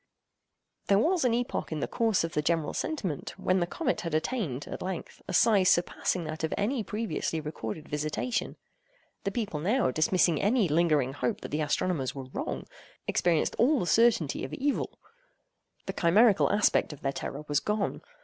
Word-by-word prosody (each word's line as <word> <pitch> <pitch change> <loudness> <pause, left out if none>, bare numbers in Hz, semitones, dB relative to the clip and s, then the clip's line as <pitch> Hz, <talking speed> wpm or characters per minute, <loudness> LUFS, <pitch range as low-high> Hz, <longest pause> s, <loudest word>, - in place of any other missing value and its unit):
There 200 - +5
was 330 - +2
an 240 - +3
epoch 245 -6 -2
in 155 - -2
the - - -1
course 225 -6 +1
of 165 +1 -3
the 150 - +1
general 160 0 0
sentiment 190 - -3
when 185 +1 +1
the 175 - 0
comet 275 - -1
had 165 -3 -3
attained, 155 - -2
at - - -6
length, 185 -2 -5
a - - -4
size 205 -5 +5
surpassing 175 0 +1
that 155 0 -5
of 160 - 0
any 225 +4 0
previously 210 -5 -2
recorded 150 -2 -6
visitation. 155 +11 -2 0.7
The 200 - 0
people 205 -9 -3
now, 210 - +2
dismissing 160 +2 +2
any 215 0 +3
lingering 150 -4 +2
hope 125 -3 -2
that - - -6
the 150 +2 -1
astronomers 150 -2 -1
were 130 -2 -7
wrong, - - -4 0.4
experienced 170 -3 +1
all 265 +4 +4
the - - -1
certainty 180 - +3
of 130 - -4
evil. 285 +1 -1 0.9
The - - -4
chimerical 200 +4 +4
aspect 205 -6 +2
of 145 - -13
their 135 0 -1
terror 145 +2 -5
was 145 -1 +2
gone. 210 -1 -2
175 Hz, 175 wpm, -29 LUFS, 150-220 Hz, 0.9 s, There